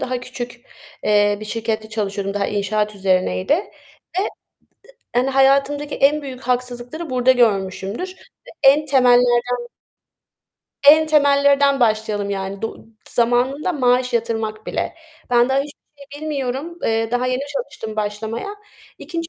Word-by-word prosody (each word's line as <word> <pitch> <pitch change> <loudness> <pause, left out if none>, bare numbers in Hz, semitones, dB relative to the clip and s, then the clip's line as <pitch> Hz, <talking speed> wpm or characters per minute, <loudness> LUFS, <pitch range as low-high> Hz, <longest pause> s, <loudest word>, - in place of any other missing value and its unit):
daha 255 -1 -2
küçük, 245 -1 -7 0.4
eee, 205 0 +3
bir - - -6
şirkette 220 0 -3
çalışıyordum, 200 -2 -3
daha 200 - 0
inşaat 210 +1 -1
üzerineydi 185 +3 +1
ve 375 0 -6
ı - - -1 0.9
yani 255 +2 +2
hayatımdaki 275 +2 +2
en 295 +2 +3
büyük 260 -2 -7
haksızlıkları 250 +5 -3
burada 255 0 +4
görmüşümdür. 205 - 0 0.4
Ve - - -12 0.2
en 295 +2 +1
temellerden 245 -2 +3 1.2
en 315 +2 +8
temellerden 280 -2 +4
başlayalım 215 -3 +1
yani 195 0 -4
du 225 - -6 0.2
zamanında 250 +8 +1
maaş 250 -3 +2
yatırmak 225 -2 -2
bile. - - -3 0.4
Ben 240 0 +4
daha 265 +1 +2
hiçbir 285 +1 -8 0.3
şey 290 - -9
bilmiyorum. 290 +2 -3
Eee, 225 0 0
daha 245 +1 0
yeni 255 +1 -1
çalıştım 225 -7 -5
başlamaya. 220 - -3 0.4
2. 330 +2 -5
245 Hz, 130 wpm, -20 LUFS, 215-280 Hz, 1.2 s, en